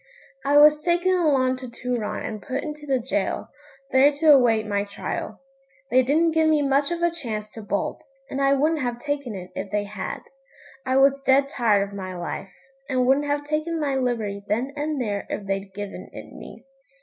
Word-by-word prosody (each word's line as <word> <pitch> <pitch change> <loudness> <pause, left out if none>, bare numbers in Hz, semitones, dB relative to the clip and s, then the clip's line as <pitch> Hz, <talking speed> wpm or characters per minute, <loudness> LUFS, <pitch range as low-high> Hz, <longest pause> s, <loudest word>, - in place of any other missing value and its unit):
I 285 +1 +3
was 300 +1 +7
taken 350 +2 +2
along 275 -7 +2
to 255 0 -8
Turon 240 -2 -3
and 215 -1 -5
put 265 +4 -3
into 300 -1 -7
the 270 -1 +2
gaol, - - -1 0.4
there 270 +2 +6
to 300 +2 +4
await 230 -5 +4
my 200 -1 0
trial. 205 +2 -5 0.5
They 255 +1 +6
didn't 310 +6 +2
give 320 0 +3
me 305 -2 +3
much 280 +1 +2
of 345 0 -3
a 345 - +3
chance 215 -10 -5
to 225 - -9
bolt, 205 -1 -3 0.2
and 275 - -3
I 275 0 +4
wouldn't 305 +3 +1
have 245 -2 -2
taken 280 -3 -3
it 180 -1 -8
if 190 0 -5
they 210 0 0
had. 200 -2 -5 0.7
I 260 +1 +2
was 275 0 +4
dead 275 +1 +3
tired 210 -7 +2
of 200 - -13
my 185 -2 -6
life, 175 +2 -5 0.4
and 255 -2 +1
wouldn't 275 +3 +3
have 290 0 0
taken 310 +3 -2
my 290 -3 0
liberty 230 -6 -1
then 245 +7 -1
and 295 0 -2
there 205 -5 -2
if 205 - -4
they'd 195 0 -3
given 200 +1 -7
it - - -10
me. - - -11
265 Hz, 195 wpm, -24 LUFS, 210-290 Hz, 0.7 s, was